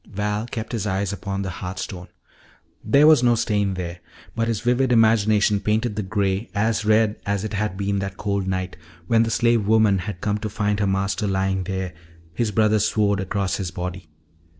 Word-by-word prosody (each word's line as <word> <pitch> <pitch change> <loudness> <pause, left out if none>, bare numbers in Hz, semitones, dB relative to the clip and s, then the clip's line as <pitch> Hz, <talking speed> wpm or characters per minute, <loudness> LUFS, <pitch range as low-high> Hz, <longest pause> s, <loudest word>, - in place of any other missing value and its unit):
Val 105 +2 -2
kept 115 -1 -5
his 110 -4 -2
eyes 95 0 -1
upon 100 0 -4
the 95 - -4
hearth 90 0 -5
stone. 90 -1 -6 0.8
There 140 +8 +4
was 155 -4 +7
no 120 -1 +4
stain 105 -4 0
there, 90 -1 -5 0.4
but 115 0 0
his 115 -3 -1
vivid 125 +1 +1
imagination 110 -2 +4
painted 105 +2 0
the 105 - -1
gray 100 +1 -1
as 110 +1 +1
red 110 0 +2
as 100 0 -1
it 110 -1 -4
had 105 -2 -2
been 100 0 -1
that 95 -1 -5
cold 100 -2 -2
night 95 0 -3 0.3
when 115 +5 +3
the 115 - +1
slave 115 -2 +2
woman 110 -3 +4
had 90 0 -5
come 105 +2 -1
to 105 - -4
find 105 0 -1
her 100 - +1
master 95 +1 0
lying 95 -1 0
there, 95 -2 -3 0.4
his 115 +5 0
brother's 110 0 +2
sword 100 -2 +1
across 95 0 -1
his 95 -3 -3
body. 90 -1 -6
105 Hz, 195 wpm, -23 LUFS, 95-110 Hz, 0.8 s, was